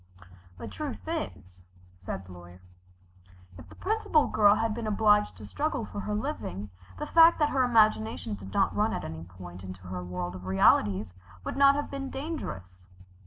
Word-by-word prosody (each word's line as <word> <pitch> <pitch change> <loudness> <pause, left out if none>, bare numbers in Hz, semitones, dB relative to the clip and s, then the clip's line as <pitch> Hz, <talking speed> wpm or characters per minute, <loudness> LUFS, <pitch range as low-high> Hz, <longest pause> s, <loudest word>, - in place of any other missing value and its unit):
"The - - -7
truth - - -6
is," 90 0 -5 0.3
said 95 +1 -6
the 90 - -13
Lawyer, 90 0 -12 1.0
"if 80 +3 -13
the - - -14
Principal 400 -7 +1
Girl 205 -1 +5
had 225 0 0
been 230 0 -4
obliged 210 0 +3
to - - -10
struggle 290 -6 -2
for 205 - -7
her 210 +1 -3
living, 105 - -4 0.3
the - - -4
fact 330 0 +6
that 300 -2 +2
her 265 - +1
imagination 215 - +2
did 95 -1 -8
not - - +1
run - - +1
at - - -3
any 80 +1 -6
point 90 0 -11
into 95 0 -9
her 90 0 -6
world 90 0 -4
of 90 0 -9
realities 95 0 +3 0.3
would - - -4
not 275 0 +6
have 290 - -3
been 275 -1 -4
dangerous." 95 - -6
100 Hz, 175 wpm, -28 LUFS, -, 1.0 s, fact